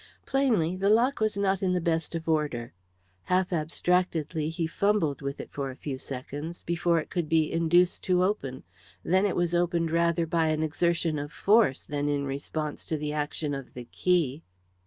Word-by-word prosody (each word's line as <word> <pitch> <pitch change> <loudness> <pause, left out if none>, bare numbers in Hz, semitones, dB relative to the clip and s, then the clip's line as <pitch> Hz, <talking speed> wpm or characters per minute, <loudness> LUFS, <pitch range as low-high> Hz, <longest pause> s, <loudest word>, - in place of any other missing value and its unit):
Plainly, 225 -12 +2
the 195 +2 +1
lock 240 +6 +3
was 215 -2 +1
not 195 -1 +1
in 185 -2 +1
the 180 - +1
best 165 0 -1
of 165 0 -5
order. 150 -7 -1 0.5
Half 185 0 +1
abstractedly 160 -1 0
he 165 0 -2
fumbled 165 -5 +1
with 140 0 -4
it - - -8
for 135 -2 -4
some 140 -3 -4
seconds, 145 +6 -6
before 170 0 +1
it 155 - -7
could 170 -4 -2
be 160 -1 +2
induced 175 +2 +3
to 180 -1 +3
open, 140 -10 -2 0.4
then 190 +3 +3
it 195 - -2
was 175 -1 0
opened 170 -1 +1
rather 170 0 +2
by 165 0 +1
an 155 0 +1
exertion 165 0 0
of 145 +1 -5
force, 205 - +3
than 145 0 -2
in 145 -1 0
response 145 +2 -4
to 160 - -2
the 150 0 -3
action 150 0 -2
of 135 -2 -7
the 125 -1 -7
key. 165 -6 +1
165 Hz, 180 wpm, -28 LUFS, 150-180 Hz, 0.5 s, lock